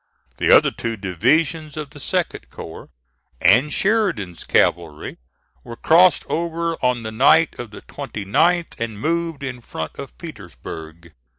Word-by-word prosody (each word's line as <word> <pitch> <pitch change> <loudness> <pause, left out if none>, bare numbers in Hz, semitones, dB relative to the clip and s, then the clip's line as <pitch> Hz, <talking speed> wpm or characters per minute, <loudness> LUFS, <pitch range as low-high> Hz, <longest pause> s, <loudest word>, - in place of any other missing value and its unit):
The - - 0
other - - +7
two 115 -1 -4
divisions 145 - 0
of 150 -2 -5
the 145 - -12
2d - - -2
corps 80 - -10 0.5
and 120 - +4
Sheridan's 185 - 0
cavalry 80 -3 0 0.4
were 120 - -8
crossed 175 +8 +4
over 170 0 -1
on 125 -2 +1
the 110 - -4
night 140 +8 +4
of 120 -2 -6
the 105 - -12
29th 165 - 0
and 115 -3 -4
moved 165 0 -1
in 130 -2 -5
front 80 -8 -6
of 140 - -8
Petersburg. 85 - -10
125 Hz, 135 wpm, -21 LUFS, 100-165 Hz, 0.5 s, other